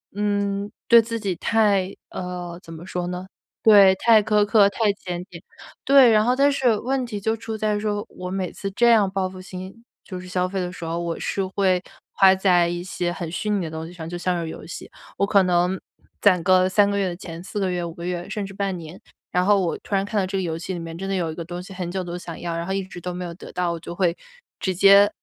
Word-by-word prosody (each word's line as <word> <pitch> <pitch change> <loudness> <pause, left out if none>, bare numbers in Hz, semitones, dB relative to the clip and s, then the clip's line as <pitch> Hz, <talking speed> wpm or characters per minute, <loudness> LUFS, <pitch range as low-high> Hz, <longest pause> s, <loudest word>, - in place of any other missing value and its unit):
嗯， 205 -1 -1 0.2
对 235 0 +9
自 230 +1 -4
己 195 -4 -2
太 200 -4 +2
呃， 180 -1 -6
怎 165 - -11
么 165 +2 -9
说 180 -1 -3
呢？ 180 +1 -5 0.4
对， 200 -3 +7
太 225 +1 +5
苛 210 0 +2
刻， 205 -2 +5
太 210 +1 +1
检 180 -3 -6
点。 170 -1 -11 0.4
对， 270 -3 +7
然 215 -1 +4
后 250 +1 +3
但 280 +1 +4
是 250 -6 +2
问 260 +2 -1
题 215 -4 -5
就 220 +2 0
出 225 -1 -5
在 210 -1 0
说， 205 0 -2
我 180 0 -7
每 185 -1 -3
次 195 - -5
这 235 +5 +3
样 215 -4 +5
报 190 -1 -1
复 185 0 -10
性， 185 +4 -9 0.2
就 185 -2 -7
是 185 - -10
消 180 0 0
费 195 0 -3
的 180 -1 -3
时 180 - -10
候， 165 +1 -2
我 170 -1 -3
是 195 -1 -2
会 185 -1 +1 0.3
花 190 -1 +6
在 180 -3 +3
一 175 0 -3
些 180 -1 -2
很 175 -2 -5
虚 210 +4 -3
拟 200 -3 +1
的 160 - -5
东 160 0 -5
西 175 - -11
上， 165 -2 -8
就 175 +1 -5
像 175 -1 -1
是 160 - -5
游 - - -9
戏。 - - -9 0.3
我 200 - +2
可 200 -1 +4
能 180 +1 +1 0.4
攒 185 -4 +4
个 185 0 +4
3 200 +2 +3
个 200 - -1
月 195 - +1
的 175 - -4
钱， 170 -2 -8
4 195 - -8
个 190 -2 0
月、 175 -1 -2
5 170 - -6
个 170 +1 -8
月 180 0 -3
甚 210 -2 -3
至 195 - -9
半 195 -2 -2
年， 165 +2 -10 0.3
然 180 0 +1
后 200 -1 +4
我 170 - -1
突 200 - -3
然 195 - +2
看 210 0 -1
到 190 - +1
这 195 - -2
个 190 - 0
游 165 -2 -2
戏 175 +3 -5
里 175 - -4
面 165 0 -7
真 195 - -5
的 195 - 0
有 170 -3 -1
一 - - -8
个 170 - -6
东 175 +1 -6
西 195 - -11
很 180 -2 -4
久 185 +1 -3
都 175 0 -5
想 170 -2 -8
要， 170 -1 -3
然 170 +1 -4
后 190 - -1
一 195 0 -1
直 185 -1 -10
都 180 +1 -4
没 180 - -5
有 170 - -6
得 - - -11
到， 180 -1 0
我 170 - -4
就 170 +1 -8
会 175 -2 +1 0.4
直 185 -2 -1
接， 200 +2 +7
185 Hz, 280 characters per minute, -23 LUFS, 175-205 Hz, 0.4 s, 对